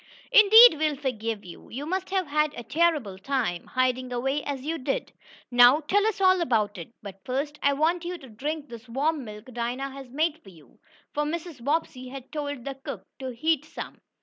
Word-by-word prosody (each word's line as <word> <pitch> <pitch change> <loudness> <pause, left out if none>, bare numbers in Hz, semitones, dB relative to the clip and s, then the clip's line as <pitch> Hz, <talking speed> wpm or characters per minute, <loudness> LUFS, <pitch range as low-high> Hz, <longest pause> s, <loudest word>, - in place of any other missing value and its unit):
"Indeed 445 -5 +9
we'll 305 -1 +1
forgive 230 -6 -3
you. 175 - -12
You 270 +5 -5
must 375 +3 -2
have 380 -1 0
had 300 0 0
a 240 - -7
terrible 290 - +1
time, 230 -7 -2
hiding 255 0 0
away 270 +4 -1
as 275 -3 -4
you 325 +2 -2
did. - - -2 0.4
Now 245 +5 +7
tell 405 +8 +2
us 440 - -1
all 375 -1 +4
about 215 - 0
it. 170 - -9
But 195 -1 -10
first 285 +4 -3
I 280 - +3
want 325 +5 +1
you 355 +1 -4
to 280 -5 -13
drink 295 +7 -4
this 235 -1 -11
warm 285 +4 0
milk 215 +2 -10
Dinah 245 +4 -3
has 270 -1 -10
made 310 +4 -1
for 195 - -15
you," 155 -8 -19 0.3
for 295 - 0
Mrs. 315 -4 -5
Bobbsey 280 -3 -1
had 265 0 -9
told 285 -5 -4
the 275 - -3
cook 270 +1 -8
to 260 -1 -4
heat 310 +4 +1
some. 305 - -9
275 Hz, 200 wpm, -26 LUFS, 245-315 Hz, 0.4 s, Indeed